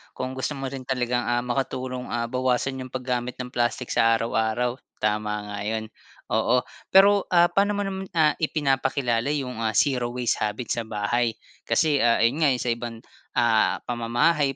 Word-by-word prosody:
Kung 130 Hz, 0 st, -3 dB
gusto 135 Hz, +3 st, -2 dB
mo 135 Hz, -1 st, -4 dB
rin 135 Hz, -2 st, -6 dB
talagang, 125 Hz, -2 st, 0 dB
ah, 120 Hz, 0 st, 0 dB
makatulong, 125 Hz, 0 st, -3 dB
ah, 115 Hz, 0 st, -1 dB
bawasan 130 Hz, +1 st, 0 dB
'yong 130 Hz, -, -11 dB
paggamit 125 Hz, -1 st, -3 dB
ng 125 Hz, 0 st, -5 dB
plastic 120 Hz, +1 st, -1 dB
sa 115 Hz, 0 st, +4 dB
araw-araw. 115 Hz, +2 st, 0 dB, 0.3 s
Tama 105 Hz, 0 st, 0 dB, 0.2 s
nga 100 Hz, -, -5 dB
'yon. 110 Hz, 0 st, -2 dB, 0.4 s
Oo 125 Hz, 0 st, +2 dB, 0.3 s
pero, 200 Hz, +1 st, +6 dB
ah, 175 Hz, -1 st, +6 dB
paano 200 Hz, +3 st, +2 dB
mo 205 Hz, -, -1 dB
naman, 190 Hz, 0 st, -5 dB
ah, 155 Hz, -2 st, +4 dB
ipinapakilala 135 Hz, -4 st, 0 dB
'yong, 125 Hz, -5 st, -4 dB
ah, 110 Hz, -, +1 dB
zero 125 Hz, 0 st, +2 dB
0 -, -, -10 dB
waste 125 Hz, -1 st, 0 dB
habit 110 Hz, +3 st, -3 dB
sa 115 Hz, -, -1 dB
bahay. 110 Hz, +2 st, 0 dB, 0.3 s
Kasi, 150 Hz, -4 st, +2 dB
ah, 120 Hz, -1 st, +4 dB
'yon 130 Hz, +7 st, +2 dB
nga 140 Hz, -, +5 dB
sa 120 Hz, -, 0 dB
ibang, 115 Hz, -1 st, -4 dB, 0.4 s
ah, 115 Hz, -2 st, +3 dB
pamamahay, 125 Hz, +5 st, +1 dB
125 Hz, 175 wpm, -25 LUFS, 115-135 Hz, 0.4 s, pero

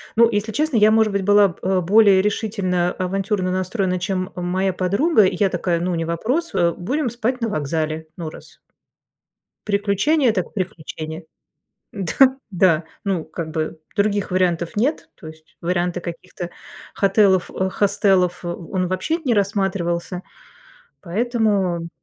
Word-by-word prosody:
Ну, 230 Hz, 0 st, +6 dB
если 205 Hz, +1 st, -1 dB
честно, 295 Hz, 0 st, 0 dB
я, 215 Hz, 0 st, +6 dB
может 220 Hz, -1 st, +3 dB
быть, 200 Hz, -1 st, -1 dB
была 205 Hz, 0 st, +5 dB
б 185 Hz, +2 st, -1 dB
более 200 Hz, +1 st, +5 dB
решительно, 200 Hz, -4 st, 0 dB
авантюрно 190 Hz, 0 st, -1 dB
настроена, 185 Hz, 0 st, -1 dB
чем 185 Hz, 0 st, -2 dB
моя 185 Hz, +2 st, 0 dB
подруга. 205 Hz, -, +3 dB
Я 190 Hz, +1 st, +1 dB
такая: 175 Hz, -1 st, -1 dB
"Ну, 175 Hz, +1 st, -1 dB
не 165 Hz, -1 st, -2 dB
вопрос, 245 Hz, -, -1 dB
а, 170 Hz, 0 st, +2 dB
будем 255 Hz, -, -2 dB
спать 240 Hz, +2 st, -2 dB
на 230 Hz, -, 0 dB
вокзале, 155 Hz, 0 st, -2 dB
ну, 165 Hz, -3 st, -4 dB
раз". -, -, -14 dB, 1.1 s
Приключение 210 Hz, +7 st, +2 dB
так 185 Hz, -5 st, -3 dB
приключение. 160 Hz, -3 st, -5 dB, 0.7 s
Да. 255 Hz, +7 st, +3 dB, 0.2 s
Да, 175 Hz, -3 st, +3 dB, 0.2 s
ну, 185 Hz, -5 st, 0 dB
как 160 Hz, 0 st, -6 dB
бы, 155 Hz, 0 st, -3 dB, 0.2 s
других 205 Hz, -2 st, 0 dB
вариантов 175 Hz, -2 st, 0 dB
нет, 260 Hz, +9 st, 0 dB
то 160 Hz, -, -12 dB
есть 155 Hz, 0 st, -14 dB
варианты 175 Hz, 0 st, -1 dB
каких-то 175 Hz, +1 st, -7 dB, 0.4 s
хотелов 195 Hz, -2 st, +3 dB, 0.2 s
хостелов- 195 Hz, -3 st, +2 dB
он 175 Hz, +1 st, -3 dB
вообще 185 Hz, -, -1 dB
не 245 Hz, -, +3 dB
рассматривался, 190 Hz, -3 st, -1 dB, 0.8 s
поэтому 200 Hz, -4 st, 0 dB
190 Hz, 135 wpm, -21 LUFS, 175-210 Hz, 1.1 s, Ну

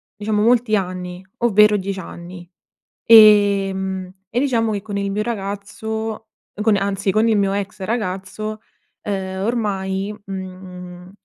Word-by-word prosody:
diciamo 210 Hz, 0 st, -1 dB
molti 235 Hz, -1 st, +3 dB
anni, 180 Hz, -1 st, -4 dB
ovvero 210 Hz, -2 st, +5 dB
10 195 Hz, 0 st, -4 dB
anni, 175 Hz, 0 st, -10 dB, 0.6 s
ehm, 195 Hz, -4 st, +5 dB, 0.2 s
e 240 Hz, -, -1 dB
diciamo 235 Hz, -5 st, +1 dB
che 205 Hz, -2 st, -2 dB
con 205 Hz, -1 st, -5 dB
il 200 Hz, 0 st, -2 dB
mio 210 Hz, +2 st, -1 dB
ragazzo, 220 Hz, +1 st, -4 dB, 0.3 s
con 215 Hz, -1 st, +4 dB
anzi, 195 Hz, 0 st, 0 dB
con 215 Hz, +3 st, +2 dB
il 225 Hz, -2 st, +3 dB
mio 200 Hz, -1 st, +1 dB
ex 200 Hz, -1 st, -4 dB
ragazzo, 215 Hz, +1 st, -3 dB, 0.4 s
ehm, 190 Hz, -1 st, -3 dB
ormai, 200 Hz, -3 st, -2 dB
mhmm 185 Hz, -1 st, -8 dB
200 Hz, 130 wpm, -20 LUFS, 190-215 Hz, 0.6 s, ovvero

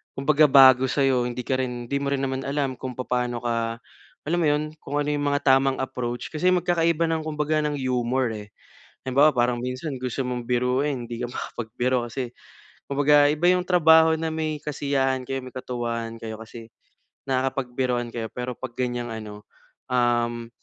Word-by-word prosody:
kumbaga 150 Hz, +2 st, +4 dB
bago 130 Hz, -1 st, +7 dB
sa'yo 135 Hz, -3 st, +2 dB
hindi 125 Hz, 0 st, -5 dB
ka 130 Hz, -, 0 dB
rin 120 Hz, -2 st, -3 dB
hindi 140 Hz, -, -1 dB
mo 140 Hz, 0 st, -1 dB
rin 140 Hz, -, 0 dB
naman 130 Hz, 0 st, -2 dB
alam 140 Hz, -2 st, -1 dB
kung 130 Hz, -1 st, -5 dB
papaano 125 Hz, -1 st, -1 dB
ka, 115 Hz, 0 st, -1 dB, 0.5 s
alam 175 Hz, +3 st, +1 dB
mo 170 Hz, -, +2 dB
yun 150 Hz, +1 st, +2 dB, 0.2 s
kung 145 Hz, +1 st, -2 dB
ano 145 Hz, -, -1 dB
yung 145 Hz, 0 st, -1 dB
mga 145 Hz, 0 st, +1 dB
tamang 135 Hz, 0 st, +4 dB
approach. 120 Hz, -2 st, -4 dB
Kasi 180 Hz, +4 st, +2 dB
magkakaiba 170 Hz, -2 st, +2 dB
ng 160 Hz, -1 st, -1 dB
kumbaga 155 Hz, 0 st, 0 dB
ng 150 Hz, -1 st, -1 dB
humor, 125 Hz, -1 st, 0 dB
eh. 105 Hz, -1 st, -9 dB, 0.6 s
Halimbawa 140 Hz, +3 st, +4 dB
parang 120 Hz, 0 st, +1 dB
minsan 130 Hz, +4 st, -4 dB
gusto 130 Hz, +1 st, -2 dB
mong 125 Hz, -1 st, -4 dB
biruin 125 Hz, +1 st, 0 dB
hindi 115 Hz, 0 st, -6 dB
ka -, -, -1 dB
makapagbiro 120 Hz, +1 st, -2 dB
kasi 125 Hz, 0 st, -4 dB, 0.6 s
kumbaga 145 Hz, +1 st, +5 dB
iba 165 Hz, +4 st, +3 dB
yung 180 Hz, 0 st, 0 dB
trabaho 160 Hz, -2 st, +6 dB
na 160 Hz, 0 st, -2 dB
may 155 Hz, -1 st, -2 dB
kasiyahan 135 Hz, -3 st, -1 dB
kayo, 135 Hz, 0 st, -3 dB
may 130 Hz, -, -9 dB
katuwaan 115 Hz, -2 st, -4 dB
kayo 110 Hz, -1 st, -6 dB
kasi 115 Hz, 0 st, -11 dB, 0.6 s
nakakapagbiruan 130 Hz, -2 st, -1 dB
kayo. 115 Hz, -1 st, -3 dB
Pero 125 Hz, 0 st, -5 dB
pag 130 Hz, -2 st, -7 dB
ganyang 120 Hz, -1 st, -2 dB
ano, 105 Hz, -2 st, -8 dB, 0.5 s
um, 120 Hz, -1 st, +1 dB
130 Hz, 170 wpm, -24 LUFS, 120-145 Hz, 0.6 s, bago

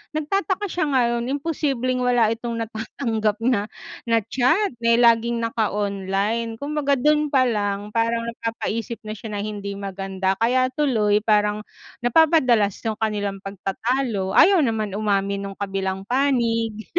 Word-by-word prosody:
Nagtataka 390 Hz, +6 st, -1 dB
siya 350 Hz, -2 st, -1 dB
ngayon, 240 Hz, -4 st, +1 dB
imposibleng 275 Hz, -4 st, -1 dB
wala 245 Hz, -3 st, +3 dB
itong 230 Hz, +1 st, -3 dB
natatanggap 220 Hz, -1 st, -2 dB
na 230 Hz, -4 st, +1 dB, 0.4 s
na 230 Hz, -1 st, +3 dB
chat 270 Hz, -, +2 dB
dahil 230 Hz, 0 st, +3 dB
laging 235 Hz, 0 st, +4 dB
naka-online. 210 Hz, 0 st, -1 dB
Kumbaga 290 Hz, -1 st, 0 dB
do'n 300 Hz, +1 st, +2 dB
pa 255 Hz, -2 st, +4 dB
lang, 205 Hz, -1 st, -2 dB
parang 230 Hz, 0 st, 0 dB
napapaisip 230 Hz, 0 st, -4 dB
na 215 Hz, -1 st, -6 dB
siya 210 Hz, +1 st, -8 dB
ng 205 Hz, -, -3 dB
hindi 200 Hz, 0 st, -5 dB
maganda. 195 Hz, -1 st, -3 dB
Kaya 255 Hz, +3 st, +2 dB
tuloy, 220 Hz, -7 st, +1 dB
parang 210 Hz, -1 st, +2 dB, 0.4 s
napapadalas 245 Hz, -, +4 dB
yung 220 Hz, -1 st, -2 dB
kanilang 205 Hz, -3 st, -2 dB
pagtatalo, 200 Hz, +2 st, -2 dB
ayaw 375 Hz, -3 st, +6 dB
naman 220 Hz, -6 st, -1 dB
umamin 200 Hz, -1 st, 0 dB
nung 195 Hz, -, -9 dB
kabilang 195 Hz, -1 st, -3 dB
panig. 230 Hz, -4 st, 0 dB
230 Hz, 130 wpm, -22 LUFS, 205-255 Hz, 0.4 s, ayaw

